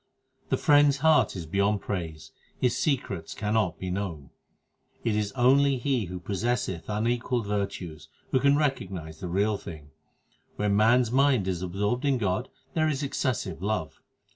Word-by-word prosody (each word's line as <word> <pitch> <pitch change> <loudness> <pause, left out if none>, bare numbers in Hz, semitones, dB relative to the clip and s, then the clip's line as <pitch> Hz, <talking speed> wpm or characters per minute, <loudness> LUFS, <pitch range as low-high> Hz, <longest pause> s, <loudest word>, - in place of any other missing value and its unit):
12 - - -32
The - - +2
Friend 145 0 +5
s 140 -1 +2
heart 160 -4 +3
is 85 -3 -5
beyond 100 +4 +1
praise: 80 -6 -5 0.3
His 125 -2 +2
secrets 105 - -2
cannot 105 -4 0
be 95 -1 -4
known. 90 -8 -4 0.7
It 115 -3 +1
is 105 -1 -1
only 135 +2 +4
he 125 -3 0
who 90 +1 -6
possesseth 100 -2 -2
unequalled 120 +2 0
virtues 100 -6 -4 0.2
who 130 - +3
can 140 +2 +4
recognize 95 - -2
the 90 - -5
Real 100 +3 +1
Thing. 75 -3 -10 0.6
When 105 -1 +1
man 115 +4 +5
s 115 -2 -2
mind 130 -6 +3
is 90 -2 -2
absorbed 100 +7 -1
in 140 -2 +2
God 105 +2 -1 0.2
there 155 -1 +2
is 145 -1 -2
excessive 130 - -2
love. 100 -7 -3
105 Hz, 165 wpm, -27 LUFS, 95-130 Hz, 0.7 s, Friend